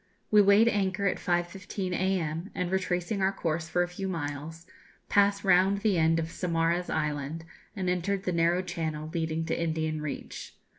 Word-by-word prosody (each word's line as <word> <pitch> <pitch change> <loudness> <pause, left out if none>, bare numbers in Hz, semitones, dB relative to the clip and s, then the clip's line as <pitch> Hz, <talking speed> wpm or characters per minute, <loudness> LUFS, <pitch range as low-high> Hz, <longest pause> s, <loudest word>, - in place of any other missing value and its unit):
We 210 -1 +7
weighed 200 +3 +6
anchor 200 -2 +1
at 195 - +1
5.15 180 +2 -2
a.m., 180 -2 -1
and, 180 -1 -2
retracing 185 +1 -1
our 190 +1 +3
course 165 -4 -2
for 175 +1 +2
a - - -2
few 185 +2 -5
miles, 160 -1 -5 0.4
passed 200 0 +3
round 195 +1 +4
the 200 -5 +2
end 160 +1 +3
of 165 0 -2
Saumarez 170 0 0
Island, 150 +1 -2 0.3
and 190 -2 -3
entered 185 +2 0
the 180 - -1
narrow 170 +2 +2
channel 160 -3 -4
leading 160 -1 -1
to 165 - -2
Indian 160 -1 -1
Reach. 150 -2 -6
175 Hz, 165 wpm, -28 LUFS, 160-190 Hz, 0.4 s, We